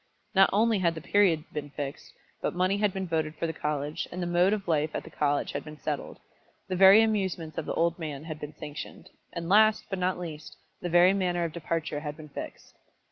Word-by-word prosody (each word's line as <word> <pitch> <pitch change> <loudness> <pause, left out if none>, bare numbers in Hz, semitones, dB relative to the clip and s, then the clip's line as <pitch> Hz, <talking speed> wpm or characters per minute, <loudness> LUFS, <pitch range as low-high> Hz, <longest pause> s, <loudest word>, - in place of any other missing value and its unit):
Not 195 0 +6
only 220 +1 +3
had 170 -2 +1
the - - -5
period 180 -4 +3
been 145 -1 -4
fixed, 145 0 -6 0.3
but - - -2
money 185 +2 +2
had 205 -1 +2
been 190 0 -3
voted 160 -2 -1
for 165 - -2
the 160 - -2
college; 150 0 -3
and 180 - -6
the 175 - -1
mode 175 +2 +3
of 210 -3 -2
life 155 -2 +1
at - - -3
the - - -12
college 145 -1 0
had - - -4
been 155 0 -10
settled; 150 -1 -4 0.5
the 185 - -2
very 195 +4 +8
amusements 190 -8 -1
of - - -5
the - - -2
old 170 +1 +1
men 150 -3 -5
had 155 -2 -7
been 150 0 -8
sanctioned; 150 0 -8 0.2
and 170 -1 -5
last, 215 +3 +5
but 190 - -2
not 185 0 0
least, 160 -4 -8 0.2
the 175 - -3
very 175 +2 +6
manner 180 -3 0
of 165 -2 -3
departure 165 -2 -3
had 150 0 -6
been 155 -1 -11
fixed. - - -8
170 Hz, 225 wpm, -28 LUFS, 150-190 Hz, 0.5 s, very